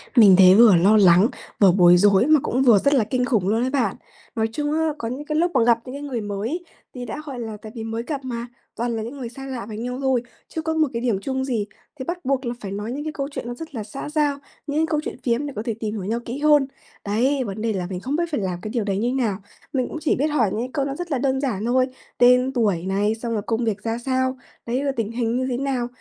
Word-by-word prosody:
Mình 205 -6 +8
thấy 185 0 +8
vừa 220 -4 +8
lo 200 +6 +5
lắng, 190 +3 +6 0.3
vừa 195 -3 +7
bối 175 -1 +6
rối 200 +3 +5
mà 310 -2 +6
cũng 260 +3 +1
vừa 225 -6 +6
rất 280 +6 +2
là 250 -6 +4
kinh 250 +3 -1
khủng 215 -8 +1
luôn 225 +4 +2
ấy 260 - 0
bạn. 250 -8 0 0.4
Nói 220 0 +1
chung 295 +2 -1
á, 320 0 +1
có 230 - -4
những 270 +5 -5
cái 305 - -3
lúc 345 +1 +2
mà 240 - +5
gặp 235 -1 +4
những 255 +2 -7
cái 285 - -6
người 260 -6 -3
mới 210 - -3 0.3
thì 250 -1 -6
đã, 300 - -6
gọi 265 -4 -6
là, 220 -2 -5
tại 215 - -9
vì 225 - -5
mới 225 +1 -4
gặp 280 -1 -4
mà, 240 -1 -4 0.3
toàn 235 0 -2
là 220 - -3
những 250 +5 -7
người 240 -3 -5
xa 270 +2 -9
lạ 245 -5 -5
với 215 -1 -7
nhau 250 +3 -4
thôi, 260 -3 +1 0.3
chưa 320 - -4
có 320 0 -1
một 315 -2 +2
cái 230 - -2
điểm 230 -6 0
chung 265 +1 -2
gì, 230 -6 -1 0.3
thì 260 - -4
bắt 355 -4 -5
buộc 270 -1 0
là 235 - -2
phải 195 -2 -6
nói 210 +4 -4
những 285 +3 -4
cái 310 - -4
câu 275 -2 -3
chuyện 240 - -6
nó 245 - -4
rất 320 0 -9
là 215 - -3
xã 270 +7 -7
giao, 295 -2 +1 0.3
những 290 +2 0
cái 320 - +3
câu 305 -2 +1
chuyện - - -5
phiếm 250 +4 0
để 280 - -6
có 210 - -3
thể 230 - -1
tìm 215 -1 -3
hiểu 200 - -4
nhau 225 +5 -1
kỹ 240 +4 -4
hơn. 295 -2 +4 0.4
Đấy, 255 +7 +1
vấn 210 -1 -5
đề 225 -1 0
là 180 -2 -3
mình 180 -2 -4
không 270 +8 -3
biết 340 - +1
phải 290 - 0
làm 180 -2 -3
cái 215 - -5
điều 230 -2 -1
đấy 195 -1 -1
như 240 +4 0
nào? 225 -8 0 0.4
Mình 255 -2 0
cũng - - -5
chỉ 310 - +2
biết 290 +4 +1
hỏi 255 -9 +2
những 225 - -2
cái 255 - -4
câu 280 -3 0
nó 275 0 -3
rất 350 -1 -6
là - - +2
là 255 - 0
đơn 265 0 0
giản 225 -6 -2
thôi, 255 +2 +2 0.3
tên 250 +1 +5
tuổi 200 -8 +1
này, 205 +3 +1
xong 230 0 -4
rồi 210 - -1
công 230 +1 0
việc 210 -2 -2
ra 225 0 -1
sao, 260 +1 -1 0.3
đấy, 250 +4 -1
rồi 275 -1 0
tình 225 -1 -1
hình 235 0 -1
như 255 - 0
thế 245 - -1
nào. 260 -3 -1
240 Hz, 300 wpm, -23 LUFS, 215-275 Hz, 0.4 s, Mình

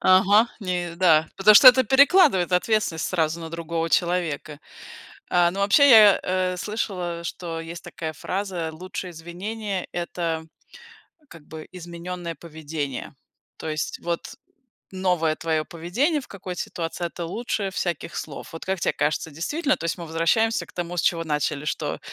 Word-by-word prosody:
Ага, 200 +5 +5
не 175 -3 -3
Да. 165 -3 +4
Потому 210 +2 +6
что 255 +5 +11
это 260 +1 +6
перекладывает 265 - +5
ответственность 180 -3 +1
сразу 165 -2 -1
на 165 - -7
другого 165 0 -3
человека. 170 -4 0 0.7
Э, 175 -1 +4
ну, 195 +3 -5
вообще 280 +9 +5
я, 215 -4 +8
э, 185 0 -1
слышала, 180 -6 -3
что 170 -2 -5
есть 165 +1 -8
такая 160 -1 -6
фраза: 185 -2 -3
"Лучшее 185 +2 -7
извинение- 190 +4 -5
это 170 -2 -3 0.9
как 160 -3 -14
бы 155 0 -9
измененное 175 -1 -7
поведение", 155 -4 -6 0.4
то 160 - -5
есть 155 -1 -3
вот 170 0 -4 0.6
новое 180 -4 0
твоё 160 -2 -1
поведение 235 - -1
в - - -14
какой-то 180 -2 -7
ситуации- 170 +1 -4
это 170 0 -6
лучшее 205 +1 -3
всяких 170 -3 -3
слов. 155 +1 -7
Вот 165 - -8
как 190 -1 -1
те - - +2
кажется 150 +1 -1
действительно, 290 - -1
то - - -9
есть 165 - -1
мы 170 - -7
возвращаемся 165 +8 +1
к - - -19
тому, 175 0 -4
с - - +2
чего 165 -1 +1
начали, 150 -1 -2
что - - -3
175 Hz, 155 wpm, -24 LUFS, 165-195 Hz, 0.9 s, что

